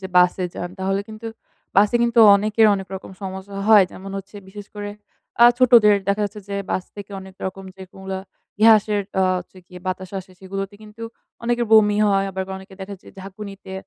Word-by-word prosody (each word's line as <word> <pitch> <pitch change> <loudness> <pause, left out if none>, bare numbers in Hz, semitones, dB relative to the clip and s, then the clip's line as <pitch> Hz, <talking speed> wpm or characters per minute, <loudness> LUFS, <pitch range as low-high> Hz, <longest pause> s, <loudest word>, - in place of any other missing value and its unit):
যে 190 - -5
বাসে 180 +1 +3
যান 175 - -5
তাহলে 195 +1 -1
কিন্তু 220 +1 -9 0.5
বাসে 205 +4 +5
কিন্তু 235 0 +1 0.2
অনেকের 215 +2 +3
অনেক 195 -1 -6
রকম 190 - -8
সমস্যা 190 +1 -7
হয়। 210 -3 +8
যেমন 195 +1 -9
হচ্ছে 195 +2 -11
বিশেষ 205 +1 -10
করে 205 0 -5 0.5
অ্যা 235 - +9
ছোটদের 235 -5 +6
দেখা 200 +1 +1
যাচ্ছে 205 +1 -6
যে 200 - -3
বাস 185 - -1
থেকে 205 0 -9
অনেক 190 0 -13
রকম 190 +1 -7
যে 190 - -10
কোন - - -16
গুলা 190 0 -4 0.4
গ্যাসের 215 -2 +5 0.2
আ - - +4 0.2
হচ্ছে 180 +1 -12
গিয়ে 180 -1 -12
বাতাস 185 0 -4
আসে 190 0 -11
সেগুলোতে 195 +1 -5
কিন্তু 215 +1 -12 0.4
অনেকের 240 0 0
বমি 210 -1 +6
হয়। 195 -1 +2
আবার 190 0 -3 0.2
অনেকে 190 0 -14
দেখা 195 +1 -6
যে - - -15
ঝাকুনিতে 195 0 -10
200 Hz, 190 wpm, -21 LUFS, 190-210 Hz, 0.5 s, অ্যা